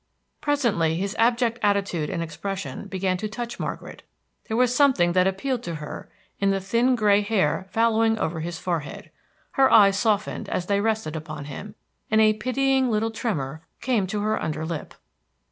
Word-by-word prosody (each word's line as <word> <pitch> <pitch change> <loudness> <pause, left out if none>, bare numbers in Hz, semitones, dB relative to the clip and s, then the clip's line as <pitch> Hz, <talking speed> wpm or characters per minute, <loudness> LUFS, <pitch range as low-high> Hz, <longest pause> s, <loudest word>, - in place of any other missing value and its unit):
Presently 235 - +1
his 195 +4 -2
abject 235 0 +2
attitude 195 -6 +1
and 170 -3 -2
expression 165 0 -5
began 190 -1 -1
to 215 +3 -4
touch 240 +2 -6
Margaret; - - -5 0.5
there 220 - -1
was 250 0 +3
something 250 -12 +4
that 185 +1 +3
appealed 240 +6 -1
to 170 -7 -5
her 150 -1 -8 0.3
in 200 - +2
the 195 0 +1
thin 235 +6 +2
gray 210 -3 +4
hair 190 -4 0
fallowing 225 +1 +2
over 160 -5 -2
his 165 +1 -4
forehead. 165 -6 -4 0.4
Her 270 -1 +4
eyes 200 -2 +6
softened 215 -2 0
as 180 - -2
they 200 +1 +1
rested 220 -7 -1
upon 155 -2 -6
him, 200 +9 -8 0.3
and 220 - +3
a 215 0 +5
pitying 260 +3 +1
little 225 0 0
tremor 155 - -3 0.2
came 230 -6 0
to 205 +2 -2
her 215 +1 0
under 155 0 -3
lip. 160 -2 -5
205 Hz, 170 wpm, -24 LUFS, 175-230 Hz, 0.5 s, eyes